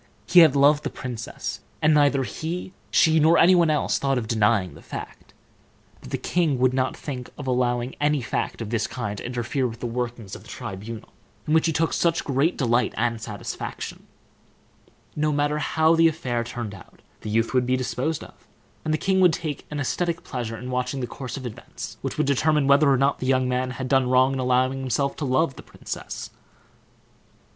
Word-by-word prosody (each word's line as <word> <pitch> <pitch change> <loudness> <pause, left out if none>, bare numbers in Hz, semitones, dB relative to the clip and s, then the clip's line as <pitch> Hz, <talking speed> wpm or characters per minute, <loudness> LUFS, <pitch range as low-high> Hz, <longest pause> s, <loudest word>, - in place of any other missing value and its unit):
He 180 - +6
had 155 -5 +7
loved 145 +2 +5
the 145 - -2
princess, 120 -4 -6 0.2
and 155 0 +4
neither 145 -2 +4
he, 170 +7 -5 0.2
she, 160 0 +4
nor 160 +2 +5
any 180 +3 +7
one 170 -3 +4
else, 150 -1 +1
thought 135 -1 +1
of 115 -3 -2
denying 105 -4 +2
the - - -13
fact; - - -9 0.7
but - - -12
the - - -2
king 165 -6 0
would 125 0 +3
not 130 0 0
think 125 -4 -6
of 145 - -7
allowing 125 -1 0
any 150 0 +2
fact 120 -1 -3
of 110 - -7
this 115 -3 0
kind 105 -5 -4
to - - -8
interfere 125 +2 -1
with 115 -1 -8
the - - -5
workings 120 -3 -4
of - - -10
the - - -16
tribunal, 105 +3 -7 0.4
in 155 - 0
which 160 +1 +4
he - - +2
took 160 +1 0
such 170 0 +1
great 140 +5 +1
delight 120 -2 +1
and 115 -1 0
satisfaction. 105 -3 -6 1.1
No 150 0 +1
matter 145 +1 0
how 160 +2 +3
the 165 0 +5
affair 130 -7 -1
turned 120 -3 -5
out, 95 - -15 0.2
the 110 - -7
youth 115 +3 +1
would 125 -1 +2
be 130 0 +2
disposed 130 +4 -2
of, - - -16 0.4
and 155 - -1
the 155 - +2
king 190 +3 +1
would 180 -3 +5
take 155 -4 -4
an 150 - -4
aesthetic 170 +4 -1
pleasure 120 -3 -4
in 125 +2 -6
watching 125 +2 -2
the - - -1
course 130 +2 -7
of 130 - -7
events, 120 - -8
which - - -4
would - - +2
determine 150 +1 +2
whether 140 +1 +5
or 135 - +4
not 135 +2 +2
the 130 - -3
young 130 -1 +2
man 125 0 0
had 130 0 -5
done 130 -1 +2
wrong 130 +1 +4
in 135 - -2
allowing 130 +1 +1
himself 135 +2 -1
to 150 - -2
love 135 +2 +1
the - - -8
princess. - - -7
130 Hz, 205 wpm, -24 LUFS, 120-150 Hz, 1.1 s, had